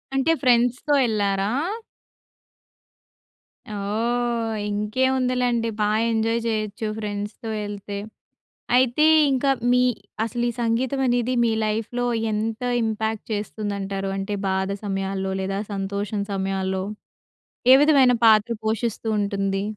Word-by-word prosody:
అంటే 270 +5 +2
ఫ్రెండ్స్‌తో 250 +3 +2
యెళ్ళారా? 200 -3 0 2.2
ఓహ్! 225 +2 -1
ఇంకేముందిలెండి 250 +2 0
బా 210 - +3 0.2
ఎంజాయ్ 225 +1 +1
జేయొచ్చు 215 -1 -2
ఫ్రెండ్స్‌తో 210 +2 -5 0.2
ఎళ్తే. 205 0 -6 0.8
అయితే 255 +4 +3 0.3
ఇంకా 270 +1 +2 0.2
మీ 250 - +4 0.4
అసలు 235 +2 -2
ఈ - - -6
సంగీతం 240 +4 0
అనేది 245 0 +1
మీ 230 - +2 0.2
లైఫ్‌లో 225 +3 -2 0.3
ఎంత 220 +2 -2 0.2
ఇంపాక్ట్ 220 -1 -2
చేస్తుందంటారు. 200 -2 -3
అంటే 200 +1 -3
బాధ 190 0 0 0.2
సమయాల్లో, 195 -1 -2
లేదా 195 +1 -2
సంతోషం 200 +1 -2
సమయాల్లో, 190 -1 -1 0.9
ఏ - - +11
విధమైన 275 -4 +5
పాత్ర 220 +1 +5
పోషిస్తూ 225 +1 -1
ఉంటుంది. 195 -1 -1
220 Hz, 100 wpm, -23 LUFS, 200-240 Hz, 2.2 s, ఏ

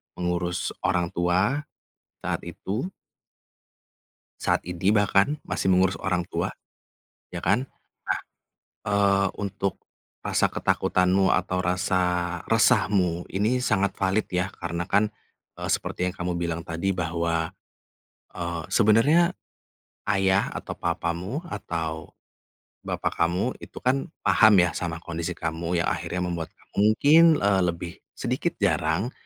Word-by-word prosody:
mengurus 90 0 -1
orang 90 -1 0
tua, 95 - +1 0.5
saat - - -3
itu 120 - -4 1.5
saat - - +2
ini 90 +3 +1
bahkan, 105 +7 +3
masih 95 - 0
mengurus 95 0 +3
orang 90 -2 0
tua. - - -2 0.8
Ya - - -4
kan? 120 +7 +2 0.4
Nah, - - 0 0.7
eee, 100 -1 +3
untuk 100 -1 -3 0.4
rasa - - +1
ketakutanmu 95 +1 +2
atau 90 0 0
rasa 90 -1 0
resahmu 90 -4 +3
ini 105 +6 +1
sangat 100 -4 +1
valid 95 +3 +1
ya, 90 +1 -1
karena 85 0 -4
kan, 100 +3 +2 0.5
eee, - - -4
seperti 90 - -2
yang 90 - -3
kamu 90 -1 -2
bilang 85 -1 -2
tadi 85 +3 -2
bahwa, 85 -1 -1 0.8
eee, 85 -1 -4
sebenarnya 145 - +4 0.8
ayah, 95 0 +2
atau - - -6
papamu, 90 - -2
atau 80 - -4 0.8
bapak - - -3
kamu 90 +9 -1
itu - - -12
kan 130 +2 +1 0.2
paham 110 -1 +6
ya 90 - +1
sama 85 -2 -3
kondisi 85 +1 -4
kamu 85 +1 -3
yang - - +1
akhirnya 90 0 -3
membuat 85 -2 -4
ka - - -25 0.2
mungkin 150 +10 +6 0.3
lebih 85 0 -4 0.2
sedikit - - -2
jarang, 85 +11 +1
90 Hz, 120 wpm, -25 LUFS, 85-100 Hz, 1.5 s, paham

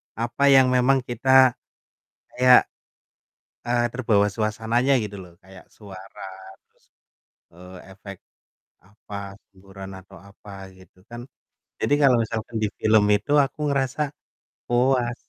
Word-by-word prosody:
apa 120 +4 -3
yang 130 -2 +5
memang 130 +1 +2
kita 130 +2 +3 0.8
kayak, 125 0 +4 1.0
eee, 120 0 +1
terbawa 110 -5 +1
suasananya 115 +5 0
gitu 105 -1 -7
loh, 90 -1 -15
kayak 95 0 -17
suara 95 -2 -13 0.4
terus, - - -39 0.7
eee, 90 +2 -14
efek 100 -1 -12 0.7
apa, 100 0 -11
semburan 95 0 -13
atau 95 0 -14
apa, 100 0 -13
gitu 95 +1 -22
kan, 120 0 -10 0.6
jadi - - -1
kalau 125 -2 +4
misalkan 110 +1 -6
di - - +1
film 110 -1 +3
itu 105 +9 +1
aku 135 +2 -7
ngerasa 140 +1 -1 0.6
puas. 120 0 0
110 Hz, 120 wpm, -23 LUFS, 100-125 Hz, 1.0 s, yang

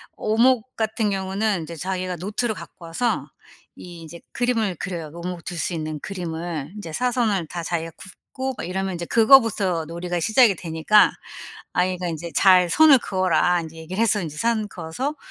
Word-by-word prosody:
오목 240 +2 +2
같은 220 -1 0
경우는 195 -1 -1
이제 170 +1 -8
자기가 185 +1 -3
노트를 210 +5 -2
갖고 170 0 -11
와서 230 +9 -1 0.5
이 175 -2 -11
이제 170 +1 -11
그림을 225 -6 0
그려요, 165 -5 -5
오목을 170 0 -6
둘 175 -2 -6
수 175 - -2
있는 155 -2 -4
그림을. 170 -5 -5
인제 170 -7 -8
사선을 230 -8 0
다 170 +1 -5
자기가 165 -1 -3
긋고 260 +7 -7
막 - - -5
이러면 190 0 -2
이제 170 - -5
그거부터 220 -8 +4
놀이가 175 +2 -4
시작이 220 0 +4
되니까 165 +6 +3 0.6
아이가 180 0 0
인제 165 0 -5
"잘 180 -2 +5
선을 300 - +6
그어라." 180 -3 +1
인제 160 0 -9
얘기를 180 +7 -4
해서 215 -3 +2
인제 155 -2 -6
선 225 -1 0
그어서 190 - -4
185 Hz, 360 characters per minute, -23 LUFS, 170-220 Hz, 0.6 s, 선을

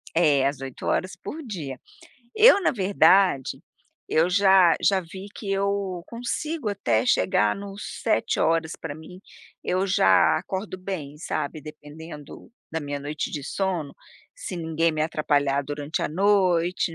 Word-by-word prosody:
É 145 -5 +4
às 140 -1 -3
8 135 -2 -7
horas 185 0 -1
por 300 - -8
dia. 150 - -6 0.6
Eu 435 -1 +7
na - - +3
verdade 190 - +3 0.5
eu 165 +3 +2
já 190 -2 +5
já 195 -2 +3
vi 190 +3 -10
que 200 - -6
eu 195 -2 -1
consigo 245 +3 -4
até 120 - 0
chegar 105 +1 +2
no 200 0 -8
7 220 - -1
horas 165 -1 +1
para 160 -3 -5
mim, 170 +4 -12 0.4
eu 185 +2 0
já 95 - +4
acordo 190 +2 -5
bem, 170 -7 -6
sabe. 155 -1 -4
Dependendo 150 0 -11 0.2
da 160 - -2
minha 145 -1 -5
noite 150 +2 -4
de 145 - -4
sono, 175 -5 -2 0.4
se 195 - -7
ninguém 165 0 0
me 155 - -1
atrapalhar 145 -3 +1
durante 145 +2 -4
a - - 0
noite, 180 -1 +2
165 Hz, 145 wpm, -25 LUFS, 150-195 Hz, 0.6 s, Eu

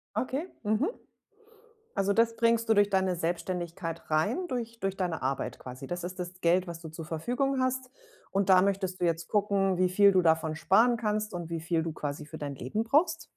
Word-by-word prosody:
Okay, 275 +7 -2 0.2
mhm. 215 - +1 1.1
Also, 195 0 +2
das 230 +2 +3
bringst 230 0 +2
du 220 - +5
durch 205 -1 +4
deine 190 -2 +1
Selbstständigkeit 170 -1 -3
rein, 225 - +1
durch 230 -2 -4
durch 195 0 -2
deine 175 -6 -2
Arbeit 135 +1 -2
quasi? 130 +1 -9
Das 175 0 -4
ist 180 +1 -6
das 180 +1 -6
Geld, 175 +2 +3
was 170 0 -7
du 160 - -8
zur 160 0 -8
Verfügung 250 - -1
hast. 255 0 -1 0.4
Und 195 0 0
da 185 -1 +7
möchtest 190 -1 0
du 175 - +1
jetzt 165 0 -1
gucken, 200 -3 +2
wie 185 0 +3
viel 200 +2 +5
du 185 -1 +4
davon 160 -1 +2
sparen 225 +8 +4
kannst 215 -2 -1
und 170 -1 -5
wie 165 -1 -3
viel 165 -1 0
du 165 -2 -4
quasi 145 0 -5
für 155 +1 -9
dein 145 -2 -5
Leben 170 - -2
brauchst? 320 +7 +2
185 Hz, 200 wpm, -29 LUFS, 165-225 Hz, 1.1 s, da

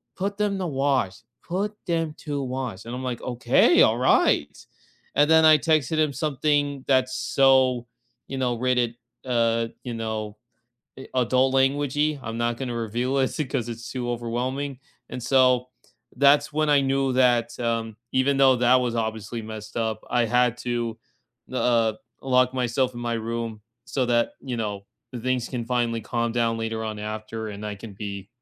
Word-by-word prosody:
"Put 200 +2 -3
them 205 -2 0
to 185 - -2
wash, 135 - 0 0.3
put 200 +4 -2
them 165 -2 0
to 145 -2 -2
wash." 125 -6 -4
And 120 - -6
I'm, 130 - -5
like, 120 - -5
"Okay, 125 -1 +4
all - - +3
right." 75 0 +3 0.6
And 145 +1 +4
then 160 0 +6
I 155 -1 +8
texted 155 0 +1
him 155 -2 +2
something 145 -1 0
that's 130 -1 +2
so, 130 -2 +3 0.4
you 135 - -5
know, 125 -2 0
rated, 125 -1 0 0.3
uh, 115 -2 +1 0.2
you 120 -2 -5
know, 110 -2 -4 0.6
eh, 135 - -9
adult 130 +1 +2
language-y. 145 +2 +1
I'm 115 0 -5
not 120 0 0
going 130 -1 -4
to 120 - -3
reveal 120 +4 -1
it 130 - +2 0.2
'cause 120 -4 -2
it's 115 0 -7
too 125 -2 -3
overwhelming. 125 +3 -3 0.3
And 125 - -6
so 125 0 +3 0.5
that's 140 +2 +4
when 155 0 +1
I 145 -1 +5
knew 135 0 +1
that, 120 -2 +2
um, 115 -2 -2 0.2
even 135 +1 +2
though 135 -1 +6
that 125 +1 +4
was 120 -1 -1
obviously 110 0 -3
messed 110 -1 -9
up, 110 -1 -2
I 120 -1 +2
had 125 +1 +2
to, 120 -2 -2 0.6
uh, 115 -3 +2 0.3
lock 130 -1 +2
myself 125 0 0
in 120 - -6
my 120 0 -1
room 115 -1 -4 0.2
so 130 -3 -1
that, 120 -1 +2
you 125 -3 -4
know, 105 -3 -4 0.4
things 130 -1 -1
can 120 -3 -4
finally 120 -2 0
calm 115 +2 -1
down 115 -1 0
later 115 0 -3
on 110 -1 -4
after 110 +1 -5
and 105 +1 -7
I 105 -1 -4
can 100 +1 -10
be 100 0 -7
125 Hz, 170 wpm, -25 LUFS, 115-135 Hz, 0.6 s, I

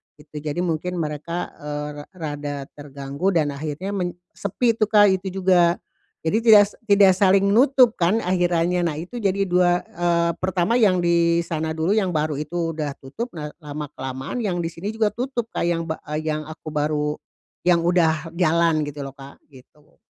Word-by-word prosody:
gitu. 150 0 -10
Jadi 150 +3 -3
mungkin 180 +1 -2
mereka, 165 +1 -4
eee, 150 0 -4 0.2
rek - - -60
rada 145 -3 -4 0.2
terganggu 140 +3 -5
dan 150 -3 +2
akhirnya 150 +6 -5
men 180 -3 -2 0.2
sepi 230 +4 0
tuh, 215 -2 0
Kak, 205 -2 +6
itu 190 - -8 0.2
juga. 175 -2 +4 0.5
Jadi 165 +7 +1
tidak 210 -3 +8
sek - - -19
tidak 200 -3 +6
saling 195 0 +4
nutup 250 +1 +4
kan 185 +6 +2
akhirannya. 175 -1 +1
Nah, 165 - 0
itu 175 +10 -7
jadi 200 -3 0
dua 180 0 +3
eee, 170 0 0
pertama 185 +5 +1
yang 190 -6 +3
di 170 0 +3
sana 160 -1 -3
dulu, 165 +7 0
yang 190 -4 +1
baru 150 -2 -1
itu 165 +2 -3
udah 145 -2 -2
tutup. 220 - -6
Nah, 150 -2 -5
lama 150 -2 -7
kelamaan 130 - -6
yang 185 -7 -1
di 165 - -2
sini 190 +6 -6
juga 220 -1 +1
tutup, 240 -1 -4
Kak, - - -2
yang 170 -1 0
bak 160 - -2
eee, 155 +1 -3
yang 155 0 -2
aku 155 0 -9
baru 150 0 -1 0.5
yang 175 -2 +4
udah 165 -2 +2
jalan 165 -2 +2
gitu 145 0 -7
loh, 135 0 -8
Kak, 135 0 -13
gitu. 145 +3 -20
170 Hz, 180 wpm, -22 LUFS, 150-190 Hz, 0.5 s, tidak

